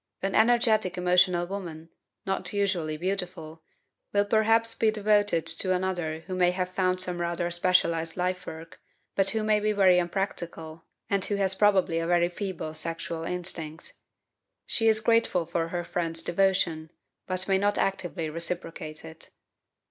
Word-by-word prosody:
An 195 0 -1
energetic 220 -5 +3
emotional 180 0 +3
woman, 170 -4 -7 0.4
not 190 -2 -2
usually 185 -7 -1
beautiful, 180 -3 -4 0.5
will 205 0 +2
perhaps 225 +2 +3
be 225 -1 +2
devoted 205 -5 +2
to 175 +3 0
another 175 -4 -2
who 185 - -7
may 180 -1 +3
have 180 0 -2
found 185 -1 +1
some 180 -1 0
rather 170 0 -2
specialized 170 -2 +1
lifework, 180 -3 -4 0.4
but 195 -1 +3
who 220 +1 -1
may 215 0 +3
be 215 +1 +1
very 190 -3 +5
unpractical, 170 -3 -4 0.2
and 200 -1 0
who 205 - -1
has 195 -1 +1
probably 190 -4 +3
a 165 - -2
very 175 0 +3
feeble 180 -4 -5
sexual 165 +1 -4
instinct; 165 -3 -4 0.7
she 225 - +2
is 220 -1 +4
grateful 230 -6 +2
for 170 0 -2
her 175 +1 -3
friends's 165 -1 -1
devotion, 175 -4 +1 0.4
but 185 0 -1
may 190 -1 +2
not 205 +1 +1
actively 175 -4 -1
reciprocate 165 -1 -4
it. 80 - -11
180 Hz, 150 wpm, -27 LUFS, 165-195 Hz, 0.7 s, very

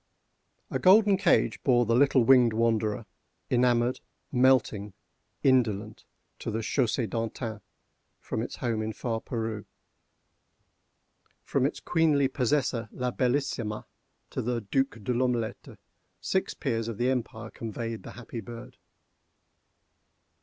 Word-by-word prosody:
A - - -1
golden 205 +2 +6
cage 190 -2 +2
bore 120 -2 +3
the 115 - +1
little 135 0 +4
winged 125 -2 +6
wanderer, 110 -1 0 0.5
enamored, 125 0 +2 0.3
melting, 125 -6 +2 0.5
indolent, 110 -5 +1 0.3
to - - -4
the 110 +1 -2
Chaussée 120 -1 0
D'Antin, 115 0 -4 0.6
from - - -3
its - - -5
home 115 -3 -2
in 110 0 -3
far 115 -1 -3
Peru. 110 -3 -4 1.8
From - - +1
its - - -6
queenly 155 -5 +2
possessor 125 -3 0
La 125 -1 -2
Bellissima, 125 -4 -1 0.5
to - - -2
the 120 0 -1
Duc 135 +4 -1
De 125 - 0
L'Omelette, 120 -2 -2 0.4
six 190 - -1
peers 115 -6 -2
of 115 -3 -5
the 125 +2 +1
empire 115 -3 -4
conveyed 115 0 -5
the - - -10
happy 120 -1 -8
bird. 115 +3 -10
120 Hz, 120 wpm, -28 LUFS, 110-130 Hz, 1.8 s, golden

